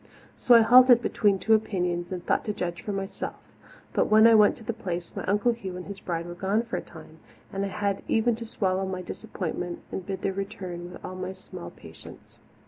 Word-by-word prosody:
So 245 Hz, -, +5 dB
I 230 Hz, -, +8 dB
halted 245 Hz, +1 st, +8 dB
between 205 Hz, -3 st, +2 dB
two 220 Hz, +3 st, +2 dB
opinions 180 Hz, -5 st, 0 dB
and 180 Hz, -1 st, -5 dB
thought -, -, +1 dB
to 210 Hz, -, -1 dB
judge 175 Hz, -3 st, -4 dB
for 210 Hz, -, -4 dB
myself, 195 Hz, 0 st, -4 dB, 0.6 s
but -, -, +2 dB
when 215 Hz, +1 st, +6 dB
I 230 Hz, -, +8 dB
went 210 Hz, -2 st, +6 dB
to 230 Hz, -, -12 dB
the 230 Hz, -, -3 dB
Place 180 Hz, -6 st, -5 dB
my -, -, -4 dB
Uncle 210 Hz, +5 st, +2 dB
Hugh 195 Hz, -6 st, -6 dB
and 180 Hz, -, -7 dB
his 200 Hz, -1 st, -8 dB
bride 170 Hz, -1 st, -3 dB
were 175 Hz, -, -7 dB
gone 195 Hz, +5 st, 0 dB
for 235 Hz, -, -5 dB
a -, -, -2 dB
time, -, -, -14 dB, 0.3 s
and 195 Hz, 0 st, -1 dB
I -, -, -1 dB
had 200 Hz, 0 st, -2 dB
even 230 Hz, +2 st, +2 dB
to 235 Hz, -, -6 dB
swallow 190 Hz, -4 st, -1 dB
my 185 Hz, -1 st, -4 dB
disappointment 175 Hz, 0 st, -5 dB
and 190 Hz, -, -4 dB
bide 190 Hz, 0 st, -5 dB
their 195 Hz, -, 0 dB
return 185 Hz, -3 st, -6 dB
with -, -, -10 dB
all 185 Hz, -, -6 dB
my 185 Hz, 0 st, -5 dB
small 185 Hz, -, -10 dB
patience. -, -, -13 dB
195 Hz, 220 wpm, -27 LUFS, 180-220 Hz, 0.6 s, I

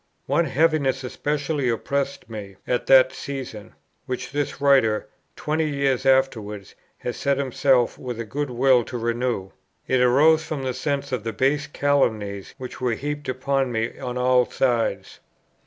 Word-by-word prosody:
One 170 Hz, -, +2 dB
heaviness 140 Hz, -2 st, +1 dB
especially 145 Hz, +1 st, -1 dB
oppressed 140 Hz, +4 st, -2 dB
me 105 Hz, -4 st, -8 dB
at 125 Hz, -, -1 dB
that 130 Hz, -1 st, +6 dB
season, 125 Hz, -7 st, -7 dB, 0.3 s
which 125 Hz, -1 st, -4 dB
this 145 Hz, -1 st, -2 dB
Writer, 130 Hz, -7 st, +3 dB, 0.3 s
twenty 155 Hz, +1 st, -1 dB
years 140 Hz, -3 st, 0 dB
afterwards, 110 Hz, -7 st, +1 dB, 0.2 s
has 125 Hz, -, -4 dB
set 140 Hz, -1 st, 0 dB
himself 130 Hz, -2 st, +2 dB
with 125 Hz, -3 st, -5 dB
a 115 Hz, -, -3 dB
good 140 Hz, +6 st, -3 dB
will 125 Hz, 0 st, +4 dB
to 125 Hz, -, -5 dB
renew: 115 Hz, -4 st, -2 dB, 0.3 s
it 130 Hz, -1 st, +2 dB
arose 150 Hz, +6 st, +5 dB
from 155 Hz, -3 st, -4 dB
the 130 Hz, -1 st, -1 dB
sense 140 Hz, +1 st, -2 dB
of 125 Hz, -5 st, -2 dB
the 115 Hz, 0 st, -3 dB
base 145 Hz, +3 st, +1 dB
calumnies 110 Hz, -9 st, 0 dB
which 130 Hz, 0 st, -8 dB
were 125 Hz, -2 st, +1 dB
heaped 145 Hz, +2 st, -4 dB
upon 135 Hz, 0 st, 0 dB
me 115 Hz, -1 st, -2 dB
on 125 Hz, -2 st, -4 dB
all 125 Hz, 0 st, +3 dB
sides. 115 Hz, -6 st, -1 dB
130 Hz, 155 wpm, -23 LUFS, 120-140 Hz, 0.3 s, that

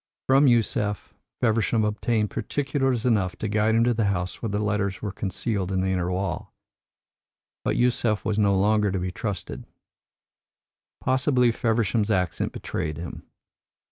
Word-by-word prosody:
From 135 Hz, +2 st, +5 dB
Yusef, 105 Hz, -5 st, +1 dB, 0.3 s
Feversham 110 Hz, -1 st, +2 dB
obtained 105 Hz, 0 st, 0 dB
particulars 135 Hz, -4 st, -1 dB
enough 100 Hz, -7 st, +1 dB
to 110 Hz, -, -4 dB
guide 110 Hz, +1 st, +2 dB
him 115 Hz, -, +4 dB
to 120 Hz, 0 st, +3 dB
the 110 Hz, -2 st, 0 dB
house 90 Hz, -2 st, -2 dB
where 115 Hz, -, -2 dB
the 100 Hz, -, -1 dB
letters 105 Hz, -2 st, -1 dB
were 105 Hz, -, -2 dB
concealed 95 Hz, 0 st, -2 dB
in 95 Hz, -1 st, +1 dB
the 95 Hz, -, 0 dB
inner 90 Hz, -1 st, 0 dB
wall. 95 Hz, -1 st, -3 dB, 1.1 s
But -, -, 0 dB
Yusef 120 Hz, -3 st, +1 dB
was 110 Hz, -1 st, 0 dB
no 100 Hz, -2 st, +3 dB
longer 105 Hz, +1 st, +3 dB
to 95 Hz, -, -1 dB
be 90 Hz, 0 st, -2 dB
trusted. 100 Hz, -3 st, -5 dB, 1.4 s
Possibly 130 Hz, -2 st, +3 dB
Feversham's 115 Hz, -2 st, 0 dB
accent 90 Hz, -5 st, 0 dB
betrayed 75 Hz, -1 st, -4 dB
him. 85 Hz, +1 st, -8 dB
105 Hz, 145 wpm, -25 LUFS, 95-115 Hz, 1.4 s, From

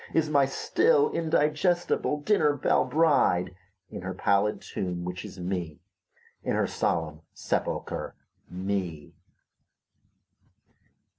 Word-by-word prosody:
Is 155 Hz, -1 st, +2 dB
n^y 140 Hz, -2 st, +4 dB
still 445 Hz, -, +2 dB
indigestible 155 Hz, -1 st, +1 dB
dinner 150 Hz, -5 st, +3 dB
belle 135 Hz, -, +2 dB
bride, 135 Hz, -, +2 dB, 0.4 s
In -, -, -6 dB
her 95 Hz, 0 st, -5 dB
pallid 100 Hz, +2 st, +1 dB
tomb, 90 Hz, -2 st, -4 dB
which 90 Hz, 0 st, -5 dB
is 95 Hz, -, -10 dB
Me, 90 Hz, -4 st, -4 dB, 0.6 s
In -, -, -1 dB
her -, -, +2 dB
solemn 80 Hz, -1 st, -2 dB
sepulcher, -, -, -3 dB, 0.3 s
Me. 90 Hz, -5 st, -4 dB
100 Hz, 100 wpm, -27 LUFS, -, 0.6 s, n^y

